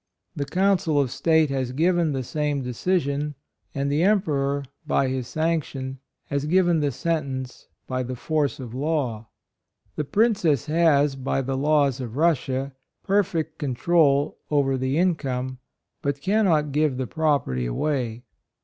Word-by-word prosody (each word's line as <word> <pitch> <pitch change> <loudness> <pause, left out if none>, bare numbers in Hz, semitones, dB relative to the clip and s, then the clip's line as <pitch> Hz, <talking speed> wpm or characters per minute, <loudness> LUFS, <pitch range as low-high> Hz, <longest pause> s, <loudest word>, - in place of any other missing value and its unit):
The 145 -3 -2
Council 180 -1 +2
of 135 -4 +1
State 160 -2 +2
has 130 -2 -2
given 170 +2 +2
the 135 -2 -2
same 145 +1 -1
decision, 145 +2 -1 0.4
and 140 0 -1
the 145 +3 +1
Emperor, 145 -8 +1 0.2
by 135 - +2
his 130 -2 -3
sanction, 145 -5 -2 0.3
has 140 0 -2
given 175 0 +3
the 145 -2 +1
sentence 135 -4 -3 0.2
the 130 -1 -3
force 150 +2 -1
of 120 -3 -7
law. 130 -6 -2 0.3
" - - -44
The 150 - 0
Princess 175 - +2
has, 150 -3 +3
by 135 0 -1
the 135 +1 -2
laws 140 -2 +2
of 120 0 -6
Russia, 135 -4 +1 0.3
perfect 185 -6 0
control 145 +1 +2
over 140 -3 +2
the 130 +2 -1
income, 130 -8 -1 0.4
but 140 0 -1
cannot 170 -5 +2
give 150 -2 +1
the 130 - -1
prop 155 +1 +1
erty 65 -1 -2
away. 120 - -2
145 Hz, 140 wpm, -24 LUFS, 130-160 Hz, 0.4 s, given